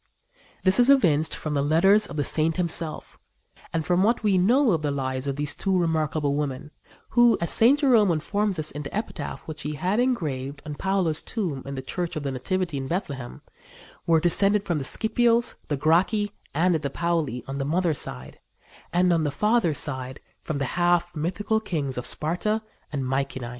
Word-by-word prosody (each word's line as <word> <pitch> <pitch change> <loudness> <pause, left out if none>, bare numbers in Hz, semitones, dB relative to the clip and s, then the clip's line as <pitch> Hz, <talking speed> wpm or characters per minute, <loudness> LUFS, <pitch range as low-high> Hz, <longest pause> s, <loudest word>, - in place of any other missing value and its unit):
This 190 +4 +5
is 245 +2 +5
evinced 160 - +3
from 155 - -4
the 140 - +1
letters 190 +9 +4
of - - -8
the 145 - 0
saint 160 +3 0
himself 165 -3 -3 0.5
and 160 -2 -2
from 180 0 +2
what 225 +3 +2
we 205 -3 +3
know 235 +8 +4
of 165 -4 +1
the 150 - -1
lives 130 -1 -2
of 140 - -1
these 145 0 -1
two 190 -1 0
remarkable 155 -3 0
women, 145 0 -3 0.4
who, 240 -1 +5
as 170 - -2
St. 245 +6 +4
Jerome 240 -8 +4
informs 200 +5 -1
us 155 -1 +3
in 145 - -6
the 145 +6 -5
epitaph 215 - -5
which 155 -1 -6
he 150 - -3
had 185 +8 -1
engraved 145 - -2
on 150 - -5
Paula's 185 -2 0
tomb 175 - -3
in 140 - -5
the 130 - -5
Church 175 +4 -4
of 155 - -4
the 140 - -2
Nativity 170 +5 -2
in 135 -1 -4
Bethlehem, 140 -7 -5 0.6
were 165 -1 +5
descended 195 +5 +2
from 170 -6 -1
the 135 - -4
Scipios, 235 - +1
the 145 - -1
Gracchi 185 +8 +2 0.2
and 175 +5 +2
the 155 -3 -1
Pauli 160 -7 -1
on 135 +1 -4
the - - 0
mother's 165 +1 0
side, 65 +1 -6 0.5
and 180 0 +3
on 165 -2 +1
the 150 - 0
father's 210 0 +1
side 130 -2 -4 0.2
from 155 - -4
the 140 - -1 0.2
half 175 0 +2
mythical 190 +8 -1
kings 150 -11 -3
of 125 - 0
Sparta 210 +8 -1 0.3
and 140 -3 -2
Mycenæ. 130 -1 -2
165 Hz, 190 wpm, -25 LUFS, 145-195 Hz, 0.6 s, This